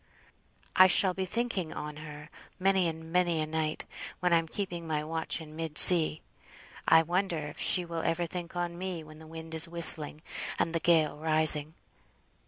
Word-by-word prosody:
"I 185 - +6
shall 190 0 +3
be 190 +1 -5
thinking 200 -5 -4
on 150 0 -8
her 150 0 -12 0.3
many 190 -1 0
and 160 0 -8
many 175 -2 0
a 155 - -2
night, 155 0 -5 0.3
when 180 -1 -1
I'm 165 -1 0
keeping 175 -2 -7
my 150 -1 -3
watch 160 +2 -5
in 155 -1 -13
mid 160 -2 -7
sea; 160 -3 +9 0.7
I 160 0 +4
wonder 175 +1 -3
if 150 -1 -9
she 180 -2 +1
will 170 -1 -6
ever 165 +2 -3
think 175 +1 -9
on 175 0 -5
me 185 -3 -6
when 155 0 -16
the 160 - -15
wind 160 0 -11
is 160 0 +3
whistling, 155 -2 +2 0.3
and 165 - -2
the 165 - -1
gale 160 -3 0
rising. 155 0 +1
165 Hz, 180 wpm, -27 LUFS, 155-175 Hz, 0.7 s, sea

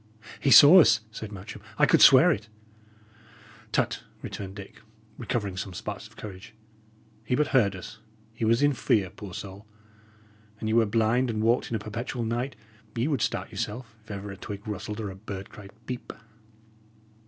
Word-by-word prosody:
"He 140 - +1
saw 145 +9 +10
us," 150 - +4
said 110 -1 -7
Matcham. 95 -1 -9 0.2
"I - - +5
could - - +4
swear - - +8
it!" 105 +2 -3 1.2
"Tut!" - - 0 0.2
returned 95 -1 -7
Dick, 100 -1 -11 0.4
recovering 110 -5 -2
some 95 -1 -6
sparks - - -6
of - - -22
courage. 100 0 -10 0.7
"He 120 +3 0
but 150 +3 +1
heard 105 -8 +3
us. 100 +4 -10 0.3
He 115 - -6
was 115 +4 +3
in 145 0 +4
fear, 100 -6 +1
poor 100 -4 -10
soul! 100 +2 -9 0.9
An 110 - -4
ye 110 - 0
were 115 -1 +4
blind, 115 +4 +1
and 110 -1 -2
walked 115 +2 +2
in 115 - -2
a - - +1
perpetual 115 +3 -5
night, 120 +4 -2 0.4
ye 120 +4 0
would 140 -7 -1
start 115 - -2
yourself, 115 -2 -5
if - - -23
ever 100 -1 -6
a 95 - -9
twig 100 +2 -8
rustled 105 +1 -5
or 105 -3 -4
a - - -10
bird 95 -1 -8
cried 105 -3 -12 0.2
'Peep.'" 125 -1 -6
110 Hz, 175 wpm, -27 LUFS, 100-120 Hz, 1.2 s, saw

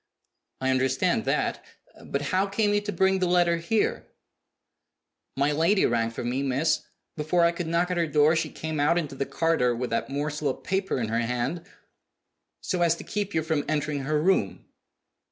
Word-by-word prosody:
"I 130 0 +1
understand 130 0 +1
that. - - -1 0.4
But 140 +1 -3
how 190 +2 +2
came 205 +1 +1
you 205 - +2
to 205 0 -4
bring 190 -1 +2
the 185 - +1
letter 175 -1 +3
here?" 190 +6 -1 1.3
"My 140 +2 +2
lady 165 +7 +3
rang 115 -1 +1
for 115 - -6
me, 125 +3 -1
miss. 140 +4 +1 0.3
Before 165 +3 +2
I 170 - +4
could 170 -1 -5
knock 170 +2 +1
at 180 - -1
her 170 -1 +1
door 150 +1 +4
she 160 - -1
came 160 -1 -5
out 150 +4 +3
into 155 -5 -2
the 135 0 -3
corridor 160 -7 +1
with 125 0 -4
that 115 - -1
morsel 150 +1 -2
of 130 - -5
paper 190 -5 -1
in 115 -3 -2
her 115 +1 0
hand 125 +9 -2 0.5
" - - -56 0.3
"So 180 -3 -1
as 170 -1 +3
to - - -9
keep 205 -1 -3
you 160 - +1
from 155 -2 0
entering 150 -1 -1
her 150 +3 0
room?" 150 - +1
155 Hz, 190 wpm, -26 LUFS, 135-175 Hz, 1.3 s, I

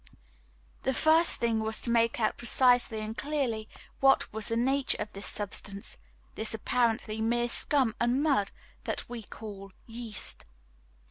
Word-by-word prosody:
The 265 - -1
first 320 +2 +4
thing 230 -1 +1
was 220 0 0
to 235 - -2
make 230 0 +2
out 215 -2 +1
precisely 245 -2 +3
and 215 +1 -5
clearly 260 -7 -2 0.3
what 270 -5 +3
was 220 -1 +3
the 230 -1 +2
nature 265 +3 +2
of 210 0 -5
this 200 +1 -4
substance, 200 +1 -4 0.4
this 220 0 -2
apparently 225 -1 0
mere 240 +2 +1
scum 260 -2 +1
and 245 +4 +1
mud 270 -11 +2 0.4
that - - -3
we 240 -1 -6
call 200 -3 -10
yeast. 230 -2 -5
230 Hz, 145 wpm, -29 LUFS, 215-250 Hz, 0.4 s, first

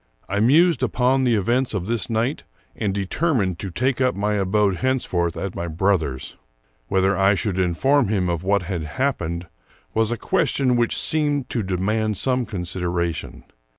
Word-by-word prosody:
I 100 +2 -1
mused 145 +5 +4
upon 130 +2 +2
the 120 -2 +3
events 120 +4 0
of 90 -3 -2
this 115 -2 -1
night, 115 +6 -1 0.3
and 105 -3 -1
determined 100 - 0
to 100 - -4
take 130 +7 -1
up 125 -1 +2
my 105 +2 0
abode 100 -1 +1
hence 130 +3 0
forth 85 -2 -1
at 95 -1 -4
my 85 - -4
brother's. 80 -6 -1 0.5
Whether 95 +1 +2
I 95 +1 +4
should 95 -2 -2
inform 125 +10 +2
him 95 -3 0
of 85 -2 -1
what 100 +1 +1
had 90 -2 -3
happened 85 - -2 0.5
was 110 0 +1
a 120 - -1
question 140 - +1
which 120 -1 +1
seemed 145 -4 0
to 115 - 0
de 95 -2 -2
mand 105 +2 0
some 125 0 0
consideration. 90 -3 -3
105 Hz, 170 wpm, -22 LUFS, 90-125 Hz, 0.5 s, mused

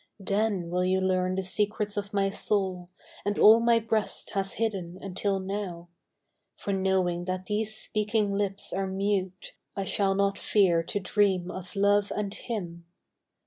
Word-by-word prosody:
Then 195 -3 -1
will 180 +1 +1
you 185 +1 +2
learn 185 -1 +1
the 190 - -1
secrets 210 +2 0
of 200 0 -3
my 195 -1 +1
soul 190 -4 -1 0.3
And 205 0 -1
all 220 +2 +8
my 235 0 +4
breast 220 -1 -1
has 195 -1 -1
hidden 190 -6 -2
until 195 +1 -2
now, 190 -3 -5 0.7
For 200 - -3
knowing 190 -2 +1
that 185 0 -3
these 215 +2 -1
speaking 210 -1 0
lips 200 -1 -2
are 195 +1 -1
mute 190 -1 -2 0.2
I 195 - -2
shall 195 0 +1
not 200 0 +1
fear 185 -5 +3
to 205 - -2
dream 185 -2 +1
of 185 +1 -8
Love 205 0 +3
and 205 -1 -2
him. 170 -8 -6
195 Hz, 155 wpm, -28 LUFS, 185-205 Hz, 0.7 s, all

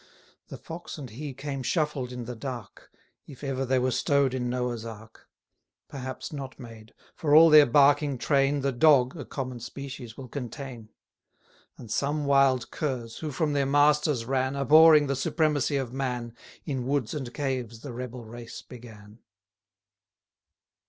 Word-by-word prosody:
The - - -8
Fox 165 +1 -8
and 135 -6 -8
he 140 +6 -6
came 135 0 -5
shuffled 150 -3 -1
in 125 -1 -6
the 125 +1 -6
dark, 120 -2 -8 0.4
190 - - -11
If 135 - -13
ever 135 -1 -2
they 130 +1 +2
were 130 0 +1
stow'd 140 +1 +2
in 125 -2 -2
Noah's 125 -2 -2
ark: 110 0 -11 0.6
Perhaps 130 +1 -6
not 135 -2 -7
made; 115 -3 -12 0.2
for 150 -2 +1
all 165 +1 +8
their 150 -1 +8
barking 140 +1 +4
train 140 +2 +1
The 140 0 0
Dog 130 0 +4
(a 150 - -7
common 130 -3 -5
species) 130 -1 -8
will 130 - -8
contain. 125 -3 -7 0.9
And 115 - -11
some 145 +5 -1
wild 135 -3 +3
curs, 125 -6 -4
who 155 - -4
from 150 +2 -1
their 140 -1 +1
masters 145 -3 +3
ran, 130 +1 0
Abhorring 155 +2 +7
the 140 0 -1
supremacy 145 0 0
of 130 -3 -4
man, 125 -3 -3 0.3
In 130 -5 -3
woods 135 -4 -1
and 135 -5 -5
caves 125 -5 -3
the 135 -2 -7
rebel 125 -1 -7
race 115 +1 -9
began. 110 -3 -13
135 Hz, 160 wpm, -27 LUFS, 120-145 Hz, 0.9 s, all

